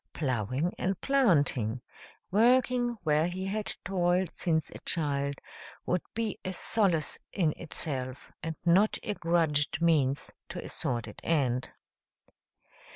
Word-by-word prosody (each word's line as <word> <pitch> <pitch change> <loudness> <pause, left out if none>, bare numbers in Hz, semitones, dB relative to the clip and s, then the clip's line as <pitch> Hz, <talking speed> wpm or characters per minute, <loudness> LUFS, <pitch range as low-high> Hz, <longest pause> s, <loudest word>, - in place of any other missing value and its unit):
"Plowing 130 - -1
and 185 0 -1
planting" 145 - +2 0.5
working 245 +2 +3
where 155 0 +3
he 185 +2 -4
had 210 +2 -2 0.2
toiled 180 -1 +1
since 160 -3 0
a - - -9
child 140 -3 -1 0.5
would 180 -1 +1
be 225 -3 -2
a 185 - -3
solace 180 -6 +1
in 160 -6 +1
itself, 135 -6 -5
and 160 -2 -4
not 190 +5 +4
a - - -2
grudged 160 -5 +1
means 150 -5 +2 0.2
to - - -6
a - - -6
sordid 115 -3 -2
end. 130 -6 +1
165 Hz, 120 wpm, -30 LUFS, 140-190 Hz, 0.5 s, not